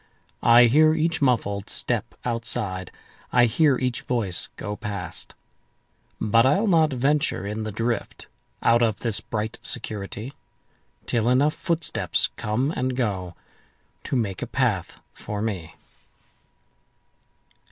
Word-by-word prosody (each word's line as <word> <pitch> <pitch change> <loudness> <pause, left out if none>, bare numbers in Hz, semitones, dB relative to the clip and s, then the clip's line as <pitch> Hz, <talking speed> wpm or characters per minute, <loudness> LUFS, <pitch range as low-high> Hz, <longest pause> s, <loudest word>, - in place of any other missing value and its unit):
I 120 +1 +7
hear 155 +6 +5
each 165 +1 0
muffled 105 -6 +1
step 120 -1 -2
outside,I 115 0 -1
hear 140 +3 +3
each 125 -2 -2
voice 105 -8 -2
go 105 0 -5
past. 100 -5 -5 0.8
But 115 +2 +4
I'll 170 - +3
not 165 -6 +4
venture 140 -3 0
in 105 +2 -3
the 110 - -3
driftOut 115 +2 -3 0.4
of 115 -2 +3
this 115 -4 -1
bright 110 +1 -4
security, 110 +2 -4 0.7
Till 115 0 +1
enough 140 +5 +3
footsteps 170 -2 0
come 125 +7 -1
and 125 0 -1
goTo 95 -8 -2 0.8
make 105 -7 -1
a - - -3
path - - -1
for 105 -1 -6
me. 100 -7 -4
115 Hz, 110 wpm, -24 LUFS, 105-130 Hz, 0.8 s, I